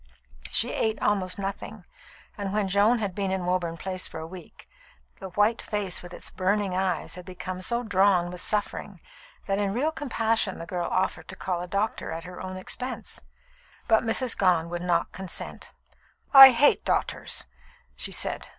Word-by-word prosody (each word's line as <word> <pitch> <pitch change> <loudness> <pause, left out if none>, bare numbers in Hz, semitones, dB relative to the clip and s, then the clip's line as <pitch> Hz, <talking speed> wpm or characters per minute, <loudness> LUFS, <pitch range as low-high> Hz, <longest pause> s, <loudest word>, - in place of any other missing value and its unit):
She - - +2
ate 220 -1 0
almost 185 -3 +1
nothing; 200 0 -5 0.5
and 200 -2 -4
when 210 -1 0
Joan 205 +5 +4
had 205 -4 -2
been 195 0 -2
in 190 -2 -2
Woburn 175 -2 -1
Place 185 +1 -3
for - - -8
a 160 - -6
week, 180 0 -12 0.5
the 190 - -7
white 210 +5 +2
face 205 -4 -3
with 175 - -11
its - - -10
burning 195 +1 0
eyes 185 -1 -1
had 180 +1 -7
become 185 0 -6
so 235 +5 0
drawn 190 -4 +3
with 180 - -6
suffering 210 -1 -3 0.5
that 195 0 0
in 200 -1 0
real 295 +6 +1
compassion 225 -8 -1
the 165 - -7
girl 175 0 -3
offered 185 +1 -1
to - - -8
call 180 -2 -3
a 180 - -5
doctor 200 +4 -2
at 165 +1 -5
her 180 0 -9
own 185 0 -6
expense. 250 +7 -6 0.7
But 220 0 +4
Mrs. 230 +2 0
Gone 175 -4 +2
would 175 0 -4
not 175 -1 0
consent. 190 -2 -6 0.6
"I 270 -1 +13
hate 260 +4 +4
doctors," - - -1 0.5
she - - 0
said. - - -1
190 Hz, 175 wpm, -26 LUFS, 180-215 Hz, 0.7 s, I